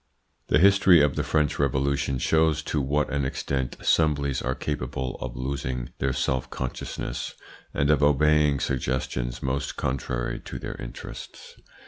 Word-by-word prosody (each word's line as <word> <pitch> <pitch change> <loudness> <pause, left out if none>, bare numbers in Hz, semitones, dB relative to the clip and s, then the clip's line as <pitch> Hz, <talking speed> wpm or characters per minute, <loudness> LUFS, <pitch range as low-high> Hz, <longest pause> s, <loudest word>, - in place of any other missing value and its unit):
The - - +4
history 95 0 +6
of 75 -2 +2
the - - 0
French 75 -2 +1
Revolution 70 0 +1
shows 80 +3 +2
to 75 - -1
what 75 +3 0
an 70 -1 +1
extent 65 -1 -2
assemblies 70 -4 +2
are 65 +1 -1
capable 65 -2 -3
of 60 -2 -5
losing 65 -1 -3
their 70 - +1
self 65 0 -1
consciousness, 65 -2 -4 0.4
and 70 +2 +2
of 75 -1 +3
obeying 75 0 +4
suggestions 65 -2 -2
most 70 +3 -2
contrary 65 -2 -2
to - - -7
their - - -5
interests. - - -9
70 Hz, 140 wpm, -26 LUFS, 65-75 Hz, 0.4 s, history